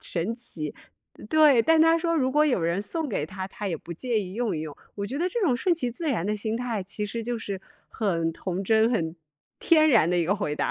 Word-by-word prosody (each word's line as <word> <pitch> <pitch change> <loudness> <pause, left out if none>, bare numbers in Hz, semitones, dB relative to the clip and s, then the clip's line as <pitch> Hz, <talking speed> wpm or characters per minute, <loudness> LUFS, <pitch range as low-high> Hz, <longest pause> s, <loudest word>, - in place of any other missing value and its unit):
神 180 +6 -2
奇。 160 - -6 0.5
“对， 300 -6 +6
但 320 +7 +4
她 325 +1 +5
说 335 0 0
如 260 -4 +2
果 300 +2 +4
有 250 - +1
人 170 +4 0
送 315 +7 -3
给 155 -8 -2
她， 190 +2 -6
她 205 +1 -6
也 170 -4 -1
不 170 +3 -9
介 225 +5 -1
意 185 0 -6
用 230 -7 -1
一 - - -3
用。 155 -2 -7 0.2
我 200 0 -4
觉 270 +6 -4
得 355 +3 +1
这 470 +5 -3
种 260 -9 +3
顺 345 +6 +2
其 250 -7 -2
自 315 +6 -4
然 220 -10 0
的 210 +1 -1
心 220 +2 -2
态， 235 -4 -2
其 210 +2 -4
实 225 +3 -4
就 240 0 -2
是 200 -4 -5 0.3
很 165 -6 -1
童 185 +3 -4
真、 220 +3 +3
很 170 -7 -1 0.4
天 315 -2 +5
然 220 -9 +5
的 180 - +1
一 170 - +2
个 195 +5 +2
回 190 -8 -2
答。 - - -1
220 Hz, 270 characters per minute, -26 LUFS, 185-265 Hz, 0.5 s, 对